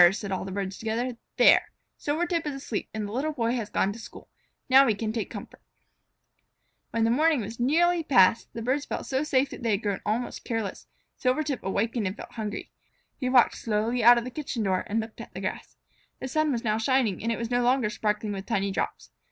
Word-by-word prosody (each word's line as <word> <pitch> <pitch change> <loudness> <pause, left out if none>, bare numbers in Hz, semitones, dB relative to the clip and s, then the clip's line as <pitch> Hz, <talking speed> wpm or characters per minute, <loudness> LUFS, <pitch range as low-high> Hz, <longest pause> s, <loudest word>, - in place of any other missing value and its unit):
said 200 0 -5
all 190 - -2
the 190 - -6
birds 195 -1 -4
together. 230 +3 -2 0.2
"There! - - +7 0.3
Silvertip 335 +2 -1
is 290 - -3
asleep 255 -6 -4
and 215 -1 -3
the - - -7
Little 285 +7 -1
Boy 235 -4 0
has 230 -4 -3
gone 200 - +1
to 230 - -10
school. 225 - -12 0.4
Now 265 +1 +8
we 220 - +2
can 215 +1 -3
take 225 -2 -3
comfort." - - -9 1.3
When 230 - 0
the 225 - +3
morning 305 +1 +3
was 225 +3 -7
nearly 335 +7 +3
past, 225 - +4
and - - -46
the 230 - -4
birds 270 +3 +1
felt - - -4
so 265 +1 0
safe 275 -2 +1
that - - -8
they 235 - -1
had 205 0 +1
grown 200 -3 -1
almost 230 +4 -2
careless, 225 -5 -4 0.3
Silvertip 270 +1 0
wakened 210 +2 -1
and 190 +4 -5
felt - - -9
hungry. 215 -3 -5 0.5
He 255 - -1
walked 250 -2 +5
slowly 225 +2 0
out 240 +1 +9
of 235 - 0
the 255 - -6
kitchen 255 -4 -3
door 185 -2 0
and 220 +2 0
looked 220 0 -6
at - - -12
the - - -4
grass. - - -5 0.4
The - - -4
sun 310 +2 +1
was 235 -3 -2
now 215 -1 +1
shining, 230 -5 +1
and 230 +2 -1
it 230 - -1
was 235 0 -4
no 245 0 +2
longer 245 -3 +2
sparkling 210 0 -1
with 195 0 -6
tiny 200 -4 0
drops. - - -3
230 Hz, 225 wpm, -27 LUFS, 210-260 Hz, 1.3 s, out